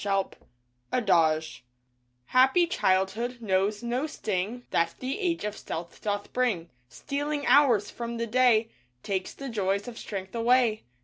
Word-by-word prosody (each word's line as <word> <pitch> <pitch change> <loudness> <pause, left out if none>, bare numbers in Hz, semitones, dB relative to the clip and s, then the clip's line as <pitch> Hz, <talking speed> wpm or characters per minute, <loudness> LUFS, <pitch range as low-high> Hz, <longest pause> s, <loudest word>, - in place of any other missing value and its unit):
DAY 205 - -3
DREAMS 195 -1 0 0.6
ADAGE 160 - +2 0.6
Happy 265 - +4
childhood 225 - 0
knows 205 0 0
no 245 +5 -1
sting 220 -2 -3
That 170 0 +1
the 260 +8 -4
age 350 -4 -1
of 210 0 -3
stealth 170 -3 -7
doth 205 -1 -3
bring. 210 -10 0 0.2
Stealing 290 - -3
hours 250 -8 +4
from 235 0 -5
the 230 - -1
day 230 -1 +3 0.3
Takes 190 -2 -3
the 275 - -7
joys 200 -3 -1
of 235 -2 -7
strength 190 -2 -6
away. 235 -1 +2
225 Hz, 140 wpm, -27 LUFS, 195-255 Hz, 0.6 s, Happy